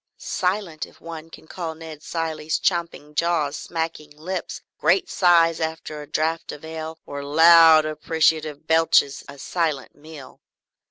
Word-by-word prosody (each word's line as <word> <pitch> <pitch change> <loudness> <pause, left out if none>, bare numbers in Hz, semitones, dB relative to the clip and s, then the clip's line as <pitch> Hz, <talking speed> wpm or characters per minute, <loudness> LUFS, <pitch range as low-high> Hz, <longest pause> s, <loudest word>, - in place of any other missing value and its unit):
Silent 180 -4 -2
if - - -21
one 165 -1 -9
can 160 - -14
call 165 -1 -6
Ned 160 -2 -10
Cilley's 160 -2 -3
champing 170 -4 -2
jaws, 155 -2 0
smacking 160 -2 -5
lips, 165 +5 -6 0.2
great 375 -1 +2
sighs 170 -3 +4
after 160 -1 -4
a 145 - -10
draught 160 +2 -2
of 150 - -10
ale, 160 0 -6
or 140 0 -6
loud 160 +1 +7
appreciative 155 0 0
belches 160 -3 +3
a 140 - -10
silent 155 -2 -2
meal. 150 -2 -13
160 Hz, 140 wpm, -23 LUFS, 155-165 Hz, 0.2 s, loud